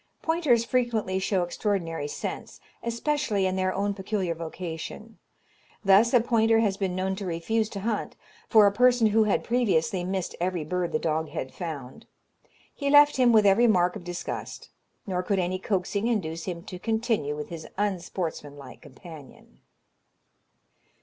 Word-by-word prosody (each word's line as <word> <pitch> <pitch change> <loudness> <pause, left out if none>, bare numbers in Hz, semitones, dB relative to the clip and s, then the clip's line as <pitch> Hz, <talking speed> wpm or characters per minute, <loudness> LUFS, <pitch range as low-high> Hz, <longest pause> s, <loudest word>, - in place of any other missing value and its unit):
Pointers 305 -9 +2
frequently 230 -7 0
show 190 -1 0
extraordinary 175 -4 -2
sense, - - -6 0.2
especially 235 -3 -1
in 185 0 0
their 185 0 0
own 200 +1 -1
peculiar 190 -2 -2
vocation. 165 +6 -7 0.7
Thus 200 +4 +6
a 245 - +6
pointer 225 -1 +3
has 210 -4 +2
been 190 -2 -2
known 190 +1 -1
to 200 - -5
refuse 215 +6 -1
to 200 - -6
hunt 220 +1 -2 0.3
for 215 -3 +7
a 200 - +5
person 245 +2 +4
who 220 +1 +4
had 210 - +1
previously 195 -7 +1
missed 185 0 -3
every 180 -2 -1
bird 180 +2 -2
the - - +1
dog 160 0 -1
had 130 - -5
found. 145 -8 -7 0.7
He 280 -1 -2
left 290 0 +6
him 250 -2 +5
with 215 -2 +5
every 205 +5 +5
mark 180 -4 +3
of - - -7
disgust, 175 0 -6 0.3
nor 185 -2 -1
could 195 +2 -1
any 185 0 -1
coaxing 200 +2 -1
induce 165 -8 -2
him 170 -2 -5
to 180 - -8
continue 220 - -1
with 150 0 -6
his 165 -2 -7
unsportsman 175 -7 -3
like 140 - -12
companion. 150 0 -14
190 Hz, 155 wpm, -26 LUFS, 175-225 Hz, 0.7 s, for